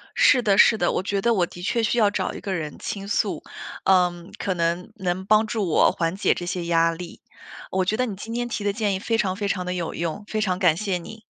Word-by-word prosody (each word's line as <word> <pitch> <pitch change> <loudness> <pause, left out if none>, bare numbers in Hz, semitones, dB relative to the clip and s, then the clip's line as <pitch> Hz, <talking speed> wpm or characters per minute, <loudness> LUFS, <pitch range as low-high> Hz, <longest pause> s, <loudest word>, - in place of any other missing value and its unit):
是 250 - +5
的 200 -4 +2
是 220 - +6
的， 175 - +1
我 - - -1
觉 200 0 -1
得 235 +3 +3
我 185 -5 +2
的 175 - -11
确 230 +5 0
需 225 - +1
要 215 -3 +5
找 - - -2
一 - - -7
个 195 - -4
人 155 -5 -4
倾 195 -1 -5
诉。 205 - -1 0.4
呃， 180 -2 +3
可 190 - -1
能 170 +3 -1
能 190 -2 -2
帮 215 +2 +4
助 215 -3 -1
我 160 - +4
缓 165 +1 -1
解 195 - +2
这 175 - -6
些 180 -1 -3
压 165 0 +3
力。 170 +1 -9 0.5
我 185 0 +1
觉 205 - +1
得 255 - +1
你 215 -5 -5
今 220 +4 -7
天 240 0 -2
提 215 - -3
的 205 0 0
建 210 -2 0
议 190 - -2
非 225 +3 0
常 190 -4 0
非 200 +1 -2
常 185 -2 -1
地 180 - -2
有 175 -3 -3
用， 170 +5 -3
非 215 0 -2
常 185 -4 0
感 175 -5 +4
谢 195 -2 -1
你。 220 +6 -10
190 Hz, 280 characters per minute, -24 LUFS, 175-215 Hz, 0.5 s, 是